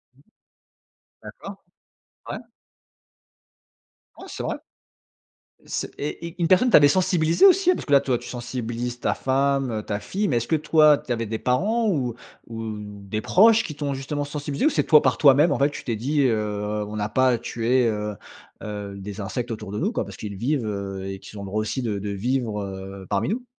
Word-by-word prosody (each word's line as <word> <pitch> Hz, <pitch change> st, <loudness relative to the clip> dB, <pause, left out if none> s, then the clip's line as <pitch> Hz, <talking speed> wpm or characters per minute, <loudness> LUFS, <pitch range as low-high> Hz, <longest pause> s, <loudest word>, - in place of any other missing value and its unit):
Mmh. 140 Hz, -, -25 dB, 1.0 s
D'accord. -, -, -9 dB, 0.7 s
Ouais. -, -, -3 dB, 1.8 s
Ouais -, -, -10 dB
c'est -, -, -6 dB
vrai. -, -, -2 dB, 1.1 s
C'est -, -, -3 dB
et 150 Hz, +3 st, -4 dB
et 170 Hz, -, -8 dB
une 165 Hz, -, +2 dB
personne 190 Hz, +7 st, +5 dB
t'avait 145 Hz, -7 st, +7 dB
sensibilisé, 170 Hz, -, +3 dB
aussi? 370 Hz, -1 st, +5 dB
Parce -, -, -4 dB
que, 145 Hz, -, -3 dB
là, 140 Hz, -, +7 dB
toi, 130 Hz, -3 st, 0 dB
tu -, -, -10 dB
sensibilises 120 Hz, 0 st, -4 dB
ta -, -, 0 dB
femme, 135 Hz, 0 st, +1 dB
heu, 110 Hz, -1 st, -2 dB
ta 105 Hz, -1 st, -3 dB
fille, 200 Hz, -, -2 dB
mais 120 Hz, -, +1 dB
est-ce 115 Hz, -, -1 dB
que, 160 Hz, -, +3 dB
toi, 155 Hz, -1 st, +5 dB
tu 125 Hz, -, -4 dB
avais 115 Hz, -1 st, -2 dB
des 110 Hz, +1 st, -3 dB
parents 210 Hz, -, +1 dB
ou 130 Hz, -, 0 dB, 0.3 s
ou 115 Hz, -1 st, -5 dB, 0.3 s
des 105 Hz, +2 st, -3 dB
proches 225 Hz, -, +5 dB
qui 150 Hz, -, -6 dB
t'ont, 145 Hz, -1 st, -3 dB
justement, 145 Hz, +2 st, -3 dB
sensibilisé? 145 Hz, -, -2 dB
Ou 315 Hz, -, +5 dB
c'est -, -, +1 dB
toi, 155 Hz, -2 st, +6 dB
par 130 Hz, -2 st, +1 dB
toi-même, 145 Hz, +2 st, +5 dB
en -, -, 0 dB
fait, 140 Hz, +1 st, +3 dB
tu -, -, -8 dB
t'es 115 Hz, -3 st, -2 dB
dit: 145 Hz, +6 st, 0 dB
«Heu, 105 Hz, -3 st, -1 dB
on 105 Hz, +1 st, -7 dB
n'a 105 Hz, 0 st, -1 dB
pas 130 Hz, +4 st, +3 dB
à 120 Hz, -2 st, +2 dB
tuer, 120 Hz, +2 st, +1 dB
heu 105 Hz, -1 st, -2 dB, 0.5 s
heu, 105 Hz, -1 st, -6 dB
des 100 Hz, +2 st, -7 dB
insectes 120 Hz, +5 st, -4 dB
autour 110 Hz, -2 st, -7 dB
de 105 Hz, -, -3 dB
nous, 205 Hz, +8 st, 0 dB
quoi, -, -, -1 dB
parce -, -, -10 dB
qu'ils 100 Hz, -2 st, -6 dB
vivent, 130 Hz, +2 st, -1 dB
heu, 100 Hz, -2 st, -4 dB
et 95 Hz, 0 st, -5 dB
qu'ils 105 Hz, -, -11 dB
ont 100 Hz, -, -6 dB
droit 100 Hz, +2 st, -2 dB
aussi 110 Hz, +5 st, -2 dB
de 105 Hz, -4 st, -2 dB
de 100 Hz, +1 st, -4 dB
vivre, 110 Hz, +1 st, -1 dB
heu, 95 Hz, 0 st, -7 dB
parmi 100 Hz, +2 st, 0 dB
nous»? 245 Hz, +5 st, -2 dB
125 Hz, 205 wpm, -24 LUFS, 105-150 Hz, 1.8 s, t'avait